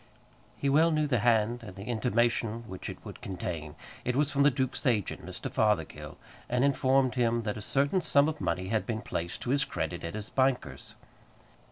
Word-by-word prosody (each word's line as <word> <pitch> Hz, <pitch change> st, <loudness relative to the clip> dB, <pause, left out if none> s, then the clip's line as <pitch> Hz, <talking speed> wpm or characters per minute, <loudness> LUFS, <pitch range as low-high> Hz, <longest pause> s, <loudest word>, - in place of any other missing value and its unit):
He 140 Hz, -, -1 dB
well 155 Hz, +4 st, +5 dB
knew 155 Hz, -2 st, +2 dB
the 130 Hz, -5 st, +1 dB
hand 115 Hz, +1 st, +2 dB
and 105 Hz, -5 st, -10 dB
the 100 Hz, -, -8 dB
intimation 115 Hz, 0 st, 0 dB
which 95 Hz, -2 st, -6 dB
it -, -, -6 dB
would -, -, -9 dB
contain. 85 Hz, -5 st, -5 dB, 0.3 s
It 125 Hz, -, -1 dB
was 145 Hz, +1 st, +2 dB
from 140 Hz, -, +1 dB
the 145 Hz, -, +7 dB
duke's 130 Hz, +1 st, -1 dB
agent, 110 Hz, -6 st, 0 dB
Mr. -, -, -6 dB
Fothergill, 105 Hz, -7 st, 0 dB, 0.3 s
and 125 Hz, +1 st, +2 dB
informed 135 Hz, -2 st, +3 dB
him 120 Hz, -2 st, +1 dB
that 105 Hz, -1 st, -2 dB
a 105 Hz, -, -6 dB
certain 140 Hz, -, +1 dB
sum 145 Hz, -3 st, +4 dB
of 155 Hz, -1 st, -3 dB
money 90 Hz, +3 st, -1 dB
had 110 Hz, 0 st, 0 dB
been 110 Hz, -2 st, -2 dB
placed 85 Hz, +1 st, -4 dB
to 125 Hz, -, -1 dB
his 140 Hz, +1 st, +3 dB
credit 85 Hz, -, -3 dB
at 85 Hz, +4 st, -4 dB
his 110 Hz, 0 st, -6 dB
banker's. 130 Hz, -1 st, 0 dB
120 Hz, 195 wpm, -29 LUFS, 105-135 Hz, 0.3 s, the